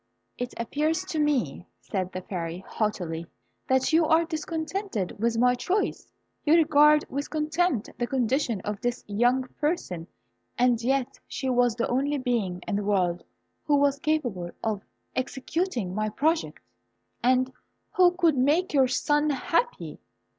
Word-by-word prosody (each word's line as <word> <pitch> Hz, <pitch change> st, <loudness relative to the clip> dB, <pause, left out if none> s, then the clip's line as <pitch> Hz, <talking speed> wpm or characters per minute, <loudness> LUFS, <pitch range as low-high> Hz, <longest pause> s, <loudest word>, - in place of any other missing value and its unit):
"It 245 Hz, 0 st, -5 dB
appears 305 Hz, +9 st, -1 dB
to 320 Hz, -4 st, -3 dB
me," 260 Hz, -, 0 dB
said 185 Hz, -2 st, -3 dB
the 185 Hz, -, -6 dB
Fairy, 175 Hz, 0 st, -5 dB
haughtily, 170 Hz, -6 st, -2 dB, 0.4 s
"that 260 Hz, +4 st, +2 dB
you 325 Hz, 0 st, +5 dB
are 325 Hz, +1 st, +4 dB
discontented 320 Hz, -, -3 dB
with 230 Hz, 0 st, +1 dB
my 250 Hz, +1 st, +4 dB
choice. 375 Hz, +11 st, -1 dB, 0.3 s
You 315 Hz, +1 st, +5 dB
regard 300 Hz, -2 st, +5 dB
with 280 Hz, +2 st, -4 dB
contempt 310 Hz, -, 0 dB
the 240 Hz, -, 0 dB
condition 250 Hz, -4 st, 0 dB
of 210 Hz, 0 st, -4 dB
this 245 Hz, 0 st, -2 dB
young 240 Hz, +5 st, +2 dB, 0.2 s
person, 295 Hz, -, -2 dB, 0.5 s
and 245 Hz, -1 st, +3 dB
yet 260 Hz, +1 st, 0 dB
she 260 Hz, 0 st, -2 dB
was 245 Hz, -2 st, +3 dB
the 230 Hz, -, 0 dB
only 280 Hz, +4 st, 0 dB
being 230 Hz, -9 st, -1 dB
in 200 Hz, -, 0 dB
the 205 Hz, -, -2 dB
world 185 Hz, -4 st, +1 dB, 0.4 s
who 295 Hz, -, +3 dB
was 280 Hz, 0 st, +2 dB
capable 245 Hz, -, -1 dB
of 215 Hz, -3 st, -1 dB, 0.3 s
executing 260 Hz, -, -2 dB
my 215 Hz, +2 st, -1 dB
project, 315 Hz, +9 st, 0 dB, 0.6 s
and 255 Hz, +1 st, +2 dB, 0.4 s
who 360 Hz, -1 st, +6 dB
could 335 Hz, -4 st, +4 dB
make 300 Hz, +8 st, +2 dB
your 270 Hz, -3 st, +5 dB
son 295 Hz, +4 st, +1 dB
happy." 335 Hz, -, -1 dB
260 Hz, 145 wpm, -27 LUFS, 215-305 Hz, 0.6 s, who